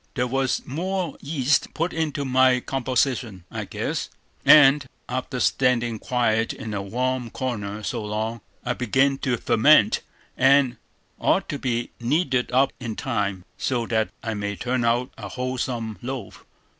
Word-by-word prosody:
There 125 - +1
was 135 0 0
more 180 +6 -2
yeast 140 -2 0
put 165 +3 -1
into 155 -3 -1
my 130 -1 +4
composition, 125 -6 -1
I - - -4
guess; - - -3 0.3
and, 145 -1 +7 0.2
after 130 +1 -3
standing 120 -4 +1
quiet 115 -2 +1
in 110 -6 -6
a 100 - -2
warm 125 +4 -2
corner 105 -5 -4
so 115 +1 -3
long, 110 +2 -3 0.2
I 125 - +1
begin 130 +3 +1
to 125 -3 0
ferment, 115 +1 +4 0.3
and 135 -2 +4 0.4
ought - - +2
to 145 - -3
be 120 -2 -2
kneaded 130 0 0
up 130 +2 +3
in 115 -4 -4
time, 100 -3 -2
so 120 -3 0
that 110 -1 0
I 115 -2 -2
may 100 -1 -3
turn 120 +6 -1
out 120 +2 +1
a 100 -3 -6
wholesome 120 -1 -3
loaf. 125 -4 -6
125 Hz, 145 wpm, -24 LUFS, 115-135 Hz, 0.4 s, and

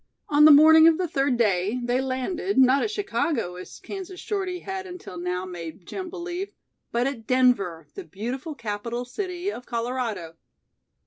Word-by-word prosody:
On 300 0 +6
the 310 - +10
morning 315 +2 +8
of 325 -1 +5
the 365 - -1
third 275 -4 +1
day 205 +1 +1
they 245 +2 +1
landed, 265 +9 -2
not 265 +1 +5
at 440 - 0
Chicago, 330 - -1
as 180 - -10
Kansas 380 -2 -8
Shorty 375 -4 -3
had 385 0 -5
until 355 - -9
now 180 +1 -3
made 175 -1 -8
Jim 375 - -6
believe, 355 +4 -5 0.4
but 240 +1 +1
at 255 -5 -4
Denver, 200 -11 +2
the 390 - -7
beautiful 255 - -5
capital 230 +2 -4
city 365 +7 -4
of 250 - -9
Colorado. 230 -8 -3
260 Hz, 165 wpm, -25 LUFS, 220-355 Hz, 0.4 s, the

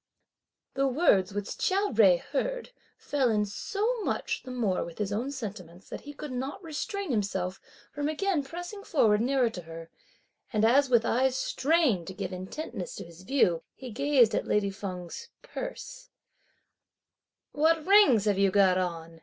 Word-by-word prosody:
The 275 0 +1
words 245 - +3
which 205 +1 -5
Chia 385 -3 +1
Jui 200 -7 +5
heard, - - -3 0.3
fell 270 -4 0
in 210 -2 +2
so 430 - -2
much 445 +2 -2
the 260 - -11
more 230 -7 0
with 170 - -9
his 205 -1 -2
own 235 +6 -2
sentiments, 195 -9 -8
that - - -7
he 290 - -9
could 290 -1 -7
not 265 +8 -4
restrain 340 +3 -4
himself 190 -4 -2 0.3
from 290 +1 -2
again 345 +1 0
pressing 355 +7 -7
forward 220 - +3
nearer 250 -1 +2
to 180 - -7
her; 165 0 -10 0.6
and 215 -2 +2
as 270 +4 +4
with 235 -3 +4
eyes 260 +2 +2
strained 270 - +1
to 190 - -7
give 185 - -4
intentness 305 - -6
to - - -7
his 170 +1 -14
view, 185 -7 +2
he 255 -2 -9
gazed 265 -1 +3
at - - -1
lady 200 -1 +1
Feng's 190 - -7
purse: - - -7 1.4
"What 320 +1 +2
rings 360 - +6
have 205 -2 +1
you 195 0 +4
got 185 -1 +4
on?" 165 -2 -4
245 Hz, 160 wpm, -28 LUFS, 195-305 Hz, 1.4 s, rings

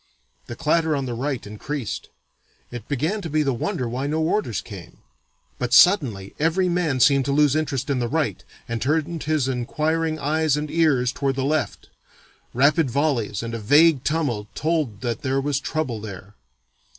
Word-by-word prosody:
The 120 - -6
clatter 160 +2 +1
on 135 -2 -2
the 125 - -4
right 130 +1 -3
increased. 110 +3 -5 0.6
It 120 -3 -8
began 155 - -1
to 170 - -5
be 155 0 +1
the 135 -2 0
wonder 125 +1 -2
why 125 +4 -3
no 155 +2 -1
orders 160 - 0
came. 90 -5 -10 0.6
But 125 0 -2
suddenly 125 - +4
every 165 +4 +2
man 170 -7 0
seemed 140 0 +4
to 140 - 0
lose 145 0 +3
interest 145 -4 -1
in 140 -2 0
the 120 - -1
right, 150 +4 -1 0.2
and 115 -1 -3
turned 155 +3 0
his 150 -3 0
inquiring 155 +6 -1
eyes 155 0 +1
and 150 0 -4
ears 145 -7 +2
toward 135 0 -1
the 135 - -1
left. 155 +1 -2 0.6
Rapid 145 +3 +3
volleys 120 -6 0
and 115 0 -5
a 115 - -3
vague 145 +5 +4
tumult 140 -10 -1
told 155 -10 -1
that 120 -3 -3
there 135 0 0
was 140 0 0
trouble 130 -9 -3
there. 100 -1 -9
140 Hz, 175 wpm, -23 LUFS, 120-155 Hz, 0.6 s, suddenly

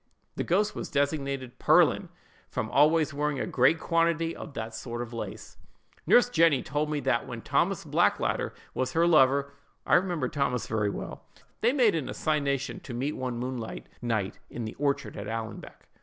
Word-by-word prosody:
"The - - -1
ghost 205 +4 +1
was - - -5
designated 140 -3 -1
'Pearlin,' - - +4 0.4
from - - -3
always 155 +1 +4
wearing 145 -1 -1
a - - -1
great 135 +6 +3
quantity 165 0 +1
of 145 - -9
that 110 0 -5
sort 120 +1 -5
of 120 0 -10
lace. 115 - -7 0.5
"Nurse 245 - +6
Jenny 165 - +3
told 150 +2 -1
me 150 -1 -1
that 125 -4 0
when - - -7
Thomas - - +1
Blackadder - - +1 0.2
was 130 +5 -2
her 165 0 +3
lover 140 -3 +4 0.3
(I - - 0
remember 175 -7 +2
Thomas 125 -3 -1
very 105 -2 0
well), - - -7 0.3
they 235 - +4
made 250 -6 +4
an 160 -5 -2
assignation 140 -3 -1
to 120 - -8
meet 135 +5 -1
one 125 -2 -3
moonlight 120 - -5 0.2
night 110 -5 -2
in 120 - -5
the 110 - -5
orchard 140 -1 -1
at 100 - -5
Allanbank. 115 0 -6
140 Hz, 170 wpm, -28 LUFS, 120-160 Hz, 0.5 s, Nurse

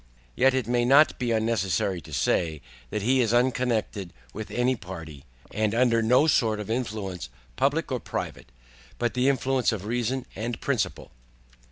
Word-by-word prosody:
Yet 135 0 +4
it 130 -3 0
may 120 +1 +1
not 140 +5 +5
be 125 -2 -1
unnecessary 100 -5 0
to - - -13
say, 80 -3 0 0.3
That 105 - -3
he 130 +3 +3
is 115 0 +2
unconnected 120 -6 0 0.2
with 110 0 -6
any 125 +1 +1
Party, 80 - -9 0.3
and 110 +1 0
under 120 -1 +3
no 125 +6 +4
sort 110 -8 +2
of 105 +1 -5
Influence 100 - -3 0.3
public - - 0
or - - 0
private, - - -6 0.5
but 120 - -1
the 125 +2 +2
influence 135 -2 +1
of 105 -3 -4
reason 120 +3 -1
and 115 +1 -4
principle. 110 -10 -2
115 Hz, 160 wpm, -26 LUFS, 100-125 Hz, 0.5 s, not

